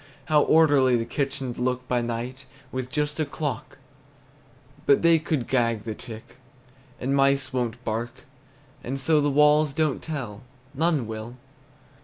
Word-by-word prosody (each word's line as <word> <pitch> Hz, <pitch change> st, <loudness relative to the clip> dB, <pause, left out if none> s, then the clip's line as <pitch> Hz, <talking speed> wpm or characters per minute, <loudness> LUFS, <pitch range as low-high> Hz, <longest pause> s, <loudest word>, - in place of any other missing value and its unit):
How 150 Hz, -1 st, +4 dB
orderly 145 Hz, -6 st, +5 dB
the 115 Hz, -1 st, 0 dB
kitchen 135 Hz, 0 st, -3 dB
'd -, -, -11 dB
look 125 Hz, 0 st, -1 dB
by 125 Hz, -1 st, +1 dB
night, 120 Hz, +3 st, -4 dB, 0.2 s
With 130 Hz, -1 st, -4 dB
just 150 Hz, +2 st, -2 dB
a -, -, +3 dB
clock, 140 Hz, -5 st, -4 dB, 1.1 s
But 140 Hz, -, +5 dB
they 165 Hz, -1 st, +6 dB
could 155 Hz, -6 st, -2 dB
gag 115 Hz, -4 st, +1 dB
the 110 Hz, -, -4 dB
tick, 110 Hz, +1 st, -10 dB, 0.6 s
And 135 Hz, +2 st, 0 dB
mice 135 Hz, -1 st, +2 dB
won't 125 Hz, -1 st, -2 dB
bark; 115 Hz, +2 st, -2 dB, 0.7 s
And 135 Hz, +3 st, -4 dB
so 150 Hz, +3 st, +3 dB
the 145 Hz, -, +2 dB
walls 150 Hz, +1 st, +4 dB
don't 155 Hz, -2 st, 0 dB
tell, 125 Hz, -10 st, -5 dB, 0.3 s
None 155 Hz, -3 st, +1 dB
will. 110 Hz, +2 st, -7 dB
130 Hz, 150 wpm, -25 LUFS, 120-150 Hz, 1.1 s, they